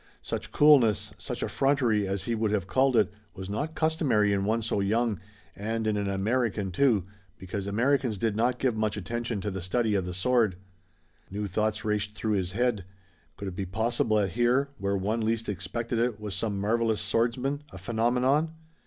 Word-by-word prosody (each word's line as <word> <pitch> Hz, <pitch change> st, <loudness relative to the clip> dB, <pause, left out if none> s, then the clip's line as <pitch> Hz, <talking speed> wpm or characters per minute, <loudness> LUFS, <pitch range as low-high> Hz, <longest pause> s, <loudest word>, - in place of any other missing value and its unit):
Such -, -, -4 dB
coolness, 135 Hz, -8 st, +4 dB
such -, -, -4 dB
effrontery, 125 Hz, -7 st, +1 dB
as 95 Hz, 0 st, -2 dB
he 115 Hz, -, -2 dB
would 110 Hz, -1 st, 0 dB
have 100 Hz, -3 st, 0 dB
called 130 Hz, +6 st, +2 dB
it, 110 Hz, -, +3 dB, 0.2 s
was 95 Hz, 0 st, -6 dB
not 150 Hz, +10 st, -3 dB
customary 140 Hz, -, +2 dB
in 100 Hz, 0 st, 0 dB
one 110 Hz, +2 st, +1 dB
so 105 Hz, -2 st, 0 dB
young, 110 Hz, 0 st, +1 dB, 0.4 s
and 110 Hz, +2 st, -2 dB
in 110 Hz, -1 st, +1 dB
an 100 Hz, -1 st, -1 dB
American 105 Hz, 0 st, 0 dB
too, 115 Hz, -2 st, +3 dB, 0.3 s
because 95 Hz, +1 st, -5 dB
Americans 120 Hz, +2 st, +1 dB
did 110 Hz, +1 st, 0 dB
not 120 Hz, +3 st, +1 dB
give 125 Hz, -3 st, 0 dB
much 110 Hz, -1 st, -1 dB
attention 115 Hz, +1 st, -3 dB
to 105 Hz, +1 st, -3 dB
the 95 Hz, 0 st, -4 dB
study 110 Hz, +4 st, 0 dB
of 95 Hz, -3 st, 0 dB
the 90 Hz, -, -4 dB
sword. 110 Hz, 0 st, +2 dB, 0.7 s
New 105 Hz, +2 st, -3 dB
thoughts 105 Hz, +2 st, -1 dB
raced 105 Hz, 0 st, -1 dB
through 110 Hz, 0 st, -1 dB
his 95 Hz, -2 st, -1 dB
head. 120 Hz, -3 st, 0 dB, 0.5 s
Could 100 Hz, -, -4 dB
it 90 Hz, -, -9 dB
be 95 Hz, 0 st, -3 dB
possible 110 Hz, +2 st, +1 dB
that 100 Hz, -3 st, +1 dB
here, 120 Hz, +5 st, +2 dB
where 100 Hz, 0 st, 0 dB
one 105 Hz, +4 st, -1 dB
least 115 Hz, +1 st, -1 dB
expected 105 Hz, +5 st, -3 dB
it, 120 Hz, -2 st, 0 dB
was 105 Hz, -2 st, -5 dB
some 100 Hz, +1 st, -2 dB
marvelous 110 Hz, +1 st, +1 dB
swordsman, 125 Hz, +5 st, 0 dB
a -, -, -9 dB
phenomenon? 125 Hz, -, +1 dB
110 Hz, 185 wpm, -28 LUFS, 100-120 Hz, 0.7 s, coolness